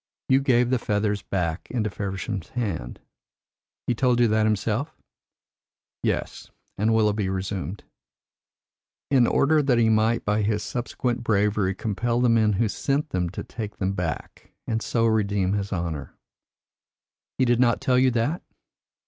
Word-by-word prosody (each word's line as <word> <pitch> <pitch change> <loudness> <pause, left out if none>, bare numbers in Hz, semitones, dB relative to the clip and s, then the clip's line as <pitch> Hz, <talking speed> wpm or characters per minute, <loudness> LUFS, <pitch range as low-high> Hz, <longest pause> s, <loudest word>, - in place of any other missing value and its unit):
"You 135 +1 +5
gave 125 -2 +3
the 130 - +2
feathers 105 -1 0
back 85 -3 -3
into 110 -4 -1
Feversham's 95 -1 -4
hand 95 - -4 0.4
" - - -69
"He - - +1
told 125 0 +2
you 120 - +5
that 110 0 +3
himself?" 110 +8 -1 1.0
"Yes;" - - -2 0.3
and 110 +3 +1
Willoughby 105 -3 +2
resumed, 95 0 -4 1.3
"in 130 -4 +5
order 155 +2 +3
that 135 -4 +2
he 115 -1 +4
might 110 +1 +2
by 105 +1 +1
his 105 0 0
subsequent 120 0 -3
bravery 105 -3 +1
compel 115 +4 -1
the 125 -1 +3
men 110 -2 +3
who 110 +3 +1
sent 140 +7 -1
them 90 -2 0
to 95 - -6
take 105 -3 -7
them 95 0 -1
back, 90 -6 -5
and 115 0 -1
so 115 0 0
redeem 100 -4 +1
his 100 -1 -2
honour." 85 -6 -4 1.2
"He 130 - +3
did 120 -1 +2
not 120 -2 +3
tell 125 -1 +2
you 130 0 +4
that?" 125 +8 0
110 Hz, 150 wpm, -25 LUFS, 100-120 Hz, 1.3 s, You